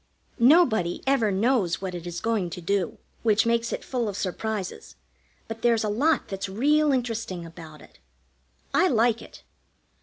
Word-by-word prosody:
Nobody 235 - +4
ever 265 -6 +2
knows 200 -3 +1
what 190 -1 -5
it 175 -1 -6
is 175 0 -5
going 220 -6 0
to 170 - -7
do, 185 +1 -1 0.2
which 220 -1 +3
makes 230 0 +1
it - - -4
full 240 -4 -2
of 200 - -5
surprises, 200 +1 -4 0.5
but 225 0 -7
there's 230 -2 +3
a 215 - -1
lot 280 +8 +1
that's 195 0 -4
real 295 +9 +2
interesting 230 -9 -2
about 160 -2 -12
it. - - -19 0.7
I - - +4
like 235 -4 +2
it. - - -14
220 Hz, 160 wpm, -25 LUFS, 185-240 Hz, 0.7 s, Nobody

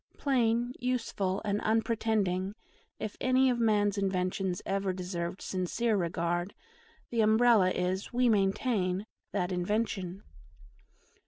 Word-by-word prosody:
Plain, 240 -3 +1
useful, 225 -6 -1
and 205 0 0
unpretending, 215 -4 0 0.4
if 215 - -5
any 255 0 +4
of 240 - -1
man's 205 -3 +2
inventions 185 -1 -1
ever 195 -1 -1
deserved 180 -1 -4
sincere 205 +5 0
regard, 175 0 -1 0.6
the 230 -2 +2
Umbrella 220 -2 +5
is, 185 +1 -2
we 250 0 +2
maintain, 195 -2 +1 0.3
that 185 -2 -1
invention. 190 0 -2
200 Hz, 105 wpm, -30 LUFS, 185-225 Hz, 0.6 s, Umbrella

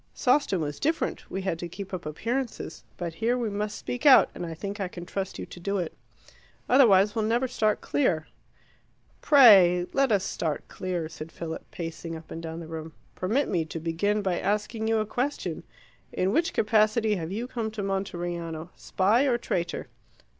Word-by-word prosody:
Sawston 250 - +2
was 145 -1 -4
different: 320 +3 -1
we 190 0 -4
had 175 -4 -2
to 175 - -4
keep 195 +2 -8
up 175 -4 -4
appearances. 235 - -3
But 170 -2 -4
here 230 +7 0
we 235 -4 -2
must 210 +1 -3
speak 245 - -5
out, 280 -3 +7
and 175 - -5
I 165 - -6
think 200 +4 -5
I 195 - -1
can 175 -1 -9
trust 195 +1 -4
you - - -5
to - - -11
do 200 +3 -1
it. 175 -4 -3 0.7
Otherwise 210 -6 +6
we'll 220 -1 0
never 240 +4 +1
start 215 -4 0
clear." 170 - +1 1.0
"Pray 195 - +7
let 275 -3 +2
us 200 -3 +3
start 160 -5 -3
clear," 180 -3 -3
said 155 0 -9
Philip, 165 -1 -7
pacing 165 0 -6
up 160 0 -11
and 165 - -5
down 165 0 -6
the - - -7
room. 160 -1 -7 0.2
"Permit 225 +10 0
me 170 -4 0
to 160 +1 -6
begin 200 +6 0
by 185 -3 0
asking 215 +2 -1
you 225 0 +2
a 215 - +1
question. 250 +7 -2 0.5
In 185 +1 0
which 330 +8 +2
capacity 215 0 +2
have 165 0 -5
you 230 +5 -3
come 230 -3 -3
to 215 -2 -5
Monteriano 175 -4 -3
spy 215 +8 +2
or 250 -4 +2
traitor?" 175 -6 -2
195 Hz, 185 wpm, -27 LUFS, 170-225 Hz, 1.0 s, out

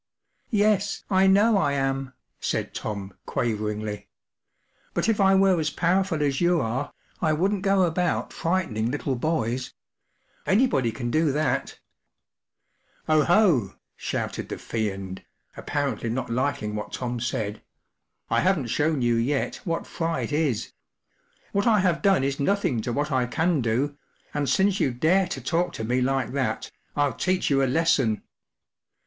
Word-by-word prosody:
“ - - -45 0.2
Yes, 205 -1 +1
I 190 0 +5
know 200 +2 +5
I 145 -6 +1
am/ 135 -1 -1
5 - - -29 0.3
said - - -1
Tom, 100 -2 -5
quaveringly. 105 -2 -2 0.5
“ - - -40
But - - +1
if 220 -3 +2
I 195 0 +5
were 190 -2 +4
as 155 -1 0
powerful 175 0 +1
as 140 0 0
you 175 0 +3
are, 130 +3 -2 0.3
I 155 -2 +2
wouldn't 190 +5 +1
go 195 -1 +3
about 175 +1 0
frightening 165 -11 -1
little 135 0 -2
boys. 125 -3 -2 0.7
Anybody 190 - +3
can 120 +1 -4
do 155 0 +2
that" 155 +2 -1 0.7
“ - - -41
Oh, 155 -2 +4
ho! 170 - +3
” - - -55
shouted - - -4
the - - -4
Fiend, 95 -4 -4 0.3
apparently 140 -5 -2
not 120 +1 -3
liking 120 -4 -1
what 105 - -5
Tom 125 -1 -3
said. 110 -3 -3 0.7
“I - - +2
haven’t 165 -11 +1
shown 150 -3 +1
you 120 -1 +2
yet 135 +5 0
what 165 -2 -2
fright 165 -2 -2
is; 145 -7 0 0.8
what 200 +3 +1
I 220 -2 +5
have 180 -3 +1
done 195 -8 +3
is 135 0 -1
nothing 145 - +1
to 120 - -3
what 145 +4 -1
I 130 -2 +1
can 160 +3 +1
do, 125 +6 0 0.4
and 145 -2 -1
since 195 0 +2
you - - +2
dare 170 +10 +2
to 130 - -5
talk 170 +7 0
to - - -5
me 125 +3 +1
like 135 0 0
that, 135 -1 -2 0.3
Ill 145 -3 +2
teach 185 +4 0
you 135 -1 +4
a 135 - +2
lesson." 135 -7 +2
145 Hz, 160 wpm, -25 LUFS, 120-180 Hz, 0.8 s, I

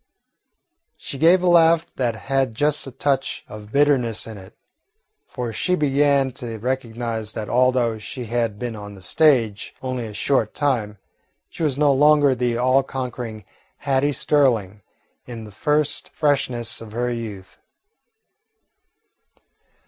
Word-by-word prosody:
She 135 - -7
gave 175 +4 +5
a - - +2
laugh 165 -1 +5
that 120 -3 -1
had 135 -1 -1
just 145 +2 +1
a - - -7
touch 135 +1 -2
of 105 0 -11
bitterness 135 -6 +2
in 110 - -8
it, 95 0 -14 0.7
for 120 -3 -5
she 180 - 0
began 140 -2 +2
to 115 -2 -5
recognise 115 -2 -3
that 110 -1 -5
although 125 -3 +2
she 125 +3 -6
had 115 -2 -1
been 120 0 -4
on 105 -1 -9
the 95 - -12
stage 120 - +2
only 130 -3 -4
a 105 - -9
short 110 0 0
time, 115 -8 -1 0.5
she - - -9
was 145 -4 0
no 145 -1 +4
longer 145 0 +5
the 120 -1 -1
all 130 +2 +3
conquering 125 -5 -6 0.3
Hattie 140 0 +1
Sterling, 120 -9 +1 0.5
in 115 -2 -7
the 105 - -11
first 150 +7 0
freshness 130 -7 0
of 110 -2 -10
her 120 +1 -1
youth. 105 -5 -8
125 Hz, 140 wpm, -22 LUFS, 110-140 Hz, 0.7 s, gave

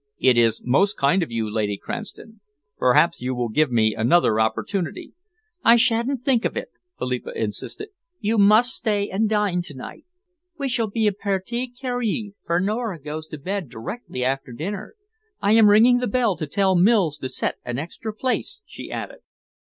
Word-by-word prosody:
"It 130 -2 +4
is 115 -2 +2
most 190 +12 +2
kind 145 +7 +3
of 165 - -2
you, 115 -2 -2
Lady 105 -1 -1
Cranston. 220 - -8 0.4
Perhaps 130 +6 +3
you 130 +1 -2
will 120 -1 -2
give 150 +5 +2
me 110 -2 +3
another 115 0 +3
opportunity." 180 - -2 0.5
"I 230 - +7
sha'n't 240 +2 +1
think 250 -4 +3
of - - -2
it," - - -4 0.3
Philippa 125 -1 -4
insisted. 115 - -4 0.3
"You 215 +1 0
must 215 +5 +5
stay 205 -3 -1
and 210 +3 +1
dine 205 -4 +1
to 150 -5 -7
night. 130 - -10 0.5
We 280 -2 -2
shall 235 -2 0
be 220 +2 -1
a 210 - +4
partie 200 +5 -2
carríe, 245 -5 -3
for 170 +1 +2
Nora 210 -1 -2
goes 155 +2 -6
to 155 - -8
bed 185 +1 -4
directly 125 - -6
after 135 0 -2
dinner. 190 - -6 0.4
I 200 - +1
am 220 -1 +7
ringing 235 +4 +6
the 250 - -1
bell 235 -3 +1
to 155 - -4
tell 195 +4 +2
Mills 180 -5 +3
to 130 - -4
set - - -2
an 125 0 -4
extra 170 +9 -5
place," 255 - -2
she - - -10
added. - - -6
195 Hz, 175 wpm, -23 LUFS, -, 0.5 s, I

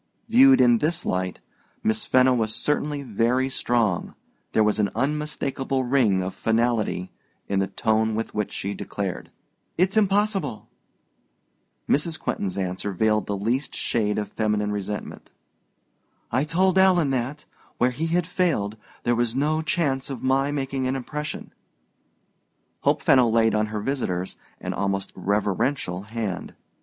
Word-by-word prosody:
Viewed 265 +4 +7
in 120 -2 +5
this 165 +5 0
light, 90 0 -2 0.4
Miss 220 0 0
Fenno 130 0 +4
was 110 -3 0
certainly 150 -1 -1
very 125 +3 +1
strong: 115 -8 0 0.4
there 110 - +3
was 105 0 +1
an 105 - +2
unmistakable 135 -1 -1
ring 120 -8 +2
of 95 - -4
finality 110 -5 0 0.4
in 100 -1 0
the 95 - +1
tone 110 +1 +1
with 115 - -3
which 105 -1 -2
she 100 +1 -3
declared, 100 -3 -5 0.5
"It's 185 +3 +2
impossible." 200 - +1 1.2
Mrs. 160 +3 +1
Quentin's 95 - -2
answer 95 +1 -2
veiled 105 +2 +1
the 100 - -2
least 120 +8 -1
shade 105 -3 0
of 105 -1 -3
feminine 105 -1 0
resentment. 105 0 -5 1.0
"I 130 +5 +1
told 185 +4 +2
Alan 180 -6 +4
that, 130 +4 -2 0.3
where 125 +1 +3
he 155 +7 -2
had 170 +1 +1
failed, 165 - 0 0.3
there 120 - +2
was 120 0 0
no 155 +3 +1
chance 150 -5 0
of 135 -4 -6
my 135 +2 +2
making 135 -2 -2
an 130 - 0
impression." 150 +3 -5 1.3
Hope - - +1
Fenno 125 -3 +5
laid 115 -1 +3
on 110 0 +1
her 105 0 -4
visitor's 95 -8 -2 0.2
an - - -4
almost 100 -1 -2
reverential 100 +1 0
hand. 105 -3 -5
120 Hz, 140 wpm, -24 LUFS, 105-145 Hz, 1.3 s, Viewed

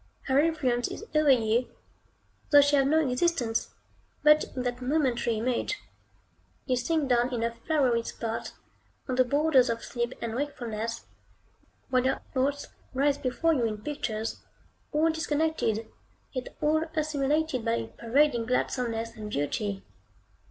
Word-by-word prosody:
Her 265 0 +2
influence 280 -7 +1
is 440 - -7
over 305 -1 +4
you, 235 -1 +3 0.8
though 290 -1 +8
she 285 +1 +3
have 270 -1 +4
no 315 0 +3
existence 250 -4 0 0.5
but 300 0 +6
in 255 - -2
that 245 0 -3
momentary 250 -4 +1
image. 250 - -1 0.9
You 255 - +1
sink 290 +4 0
down 245 0 +2
in 235 -2 -1
a 230 0 0
flowery 245 -1 +1
spot, 230 0 -5 0.5
on 260 - -2
the 255 0 +4
borders 280 -1 +3
of 230 0 -2
sleep 240 0 -3
and 230 -1 -4
wakefulness, 230 -4 -4 0.9
while 255 -1 +3
your 260 - 0
thoughts 275 +2 0 0.3
rise 280 +1 +2
before 300 +6 +1
you 250 -6 +1
in 215 -1 -3
pictures, 225 -7 -3 0.5
all 315 +2 +3
disconnected, 305 -8 0 0.5
yet 255 -2 -4
all 310 +1 +3
assimilated 300 -3 0
by - - +1
a 115 -1 -2
pervading 235 - +1
gladsomeness 230 -2 -1
and 215 -2 -7
beauty. 195 +5 -2
255 Hz, 140 wpm, -28 LUFS, 230-295 Hz, 0.9 s, though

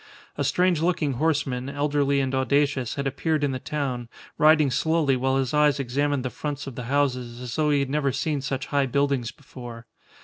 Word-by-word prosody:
A - - -1
strange 180 -3 +2
looking 165 -5 +1
horseman, 140 -5 0
elderly 145 -1 +1
and 135 0 -2
audacious, 135 -1 +1
had 140 - -3
appeared 150 +3 -1
in 140 - +1
the 130 - -3
town, 130 -5 -3 0.3
riding 155 -2 +5
slowly 155 0 +2
while 130 +1 +1
his 135 0 -1
eyes 150 -1 +3
examined 140 +1 -1
the 130 - -2
fronts 145 -2 -4
of 135 - -7
the 125 0 -6
houses, 125 -3 -1
as 125 -1 -6
though 155 -1 +1
he 145 -1 +3
had 135 - -2
never 145 -2 +1
seen 150 +2 -1
such 135 -1 -3
high 140 -2 +1
buildings 140 -2 0
before. 120 -4 -10
140 Hz, 195 wpm, -25 LUFS, 130-150 Hz, 0.3 s, riding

